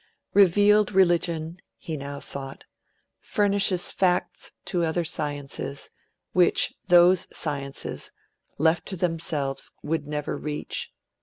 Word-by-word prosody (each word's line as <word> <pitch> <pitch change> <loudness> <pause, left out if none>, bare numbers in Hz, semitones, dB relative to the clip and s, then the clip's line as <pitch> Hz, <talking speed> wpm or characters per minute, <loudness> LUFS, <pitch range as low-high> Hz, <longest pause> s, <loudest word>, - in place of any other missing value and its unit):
'Revealed 205 +2 +5
religion,' 170 -3 +2 0.2
he 160 - -5
now 140 0 -6
thought, 135 -1 -8 0.6
'furnishes 200 -3 +1
facts 180 -2 0 0.2
to 175 -2 0
other 165 +1 0
sciences, 145 -3 -4 0.4
which 180 -1 +3
those 175 +1 +6
sciences, 140 -3 -4 0.5
left 160 +3 +2
to 195 - -4
themselves, 160 -5 -2
would 150 -1 -2
never 150 -1 -3
reach. 150 -1 -4
165 Hz, 100 wpm, -25 LUFS, 145-180 Hz, 0.6 s, those